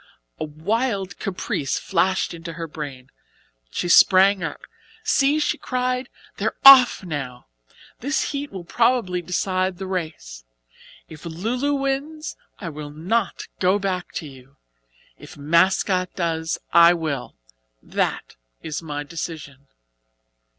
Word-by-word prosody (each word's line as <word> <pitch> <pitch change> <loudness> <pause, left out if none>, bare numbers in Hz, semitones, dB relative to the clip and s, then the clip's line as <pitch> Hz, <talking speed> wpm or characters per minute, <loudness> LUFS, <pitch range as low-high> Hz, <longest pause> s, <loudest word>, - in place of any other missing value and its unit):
A - - -2
wild 200 - -2
caprice 180 -8 -2
flashed 190 0 0
into 165 0 -7
her 165 +1 -5
brain. 140 -4 -8 0.6
She 175 - -3
sprang 190 +2 +6
up. 165 - -5 0.4
"See," 285 +2 +3
she 300 - 0
cried, 250 0 -2 0.3
"they're - - -1
off 260 -6 +9
now. 135 -8 -5 0.5
This 285 +5 -1
heat 285 0 -4
will 190 -3 -7
probably 230 -3 +1
decide 185 +1 -1
the 190 - -5
race. 155 - -5 0.6
If 155 -2 -12
'Lu 180 +8 -3
Lu' 285 +3 0
wins 280 +3 -3 0.2
I 185 - -7
will 150 -1 -7
not 180 +8 -1 0.2
go 185 +2 +3
back 190 -3 -3
to 155 - -5
you, 135 0 -15 0.6
if - - -12
'Mascot' 180 +4 +2
does 165 -2 -1 0.2
I 170 +1 +7
will. 150 -6 -4 0.5
That - - -2 0.3
is 155 0 -4
my 145 -2 -5
decision." 145 -3 -7
180 Hz, 125 wpm, -23 LUFS, 155-220 Hz, 0.6 s, off